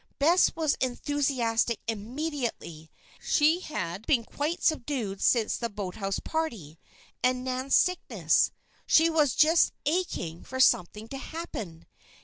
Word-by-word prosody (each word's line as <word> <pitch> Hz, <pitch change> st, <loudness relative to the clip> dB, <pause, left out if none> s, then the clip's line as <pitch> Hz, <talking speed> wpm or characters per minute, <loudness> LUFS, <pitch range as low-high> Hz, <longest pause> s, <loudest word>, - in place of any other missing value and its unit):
Bess 335 Hz, +6 st, +4 dB
was 315 Hz, -3 st, +1 dB
enthusiastic 250 Hz, -3 st, 0 dB
immediately. 230 Hz, -, -4 dB, 0.3 s
She 315 Hz, +3 st, +3 dB
had 205 Hz, -, -5 dB
been 255 Hz, -6 st, +3 dB
quite 305 Hz, +9 st, -3 dB
subdued 240 Hz, -, -1 dB
since 230 Hz, -3 st, +2 dB
the 235 Hz, -, -3 dB
boathouse 195 Hz, -1 st, -4 dB
party, 220 Hz, -, -4 dB, 0.4 s
and 250 Hz, 0 st, +1 dB
Nan's 260 Hz, +1 st, 0 dB
sickness; 365 Hz, -1 st, +2 dB, 0.4 s
she 330 Hz, +1 st, +5 dB
was 300 Hz, -6 st, +2 dB
"just 320 Hz, +2 st, +4 dB
aching" 290 Hz, -, -2 dB
for 260 Hz, -, -6 dB
something 210 Hz, -2 st, +2 dB
to 270 Hz, -, -6 dB
happen! 225 Hz, -, -7 dB
255 Hz, 120 wpm, -28 LUFS, 215-310 Hz, 0.4 s, she